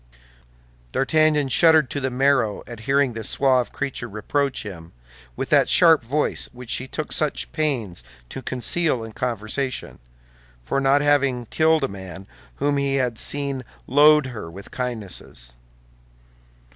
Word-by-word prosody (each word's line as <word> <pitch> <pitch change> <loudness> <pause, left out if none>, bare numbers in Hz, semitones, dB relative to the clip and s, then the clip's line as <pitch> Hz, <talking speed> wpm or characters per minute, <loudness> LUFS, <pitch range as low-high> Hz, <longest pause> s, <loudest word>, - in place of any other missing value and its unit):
D'Artagnan 155 0 +2
shuddered 160 -1 +5
to 145 - -2
the 135 -1 -1
marrow 130 -4 +1
at 120 -2 -9
hearing 140 -2 +2
this 115 -1 -3
suave 130 -3 +2
creature 140 -4 -4
reproach 135 +6 -2
him, 85 -5 -10 0.4
with - - -4
that - - +4
sharp 165 -3 +6
voice 145 +6 -1
which 125 -1 -6
she 130 - 0
took - - -5
such - - -1
pains 115 - -1 0.3
to - - -7
conceal 130 +2 0
in 115 - -8
conversation, 125 +3 -3 0.6
for 135 - -1
not 135 +1 +3
having 140 -4 +2
killed 160 +4 +2
a - - +2
man 95 -2 -9 0.3
whom 145 0 0
he 140 -1 0
had 125 -4 -1
seen 140 -2 0 0.2
load 150 +2 +5
her 110 -9 -7
with 95 +4 -11
kindnesses. 105 - -5
130 Hz, 140 wpm, -22 LUFS, 110-145 Hz, 0.6 s, sharp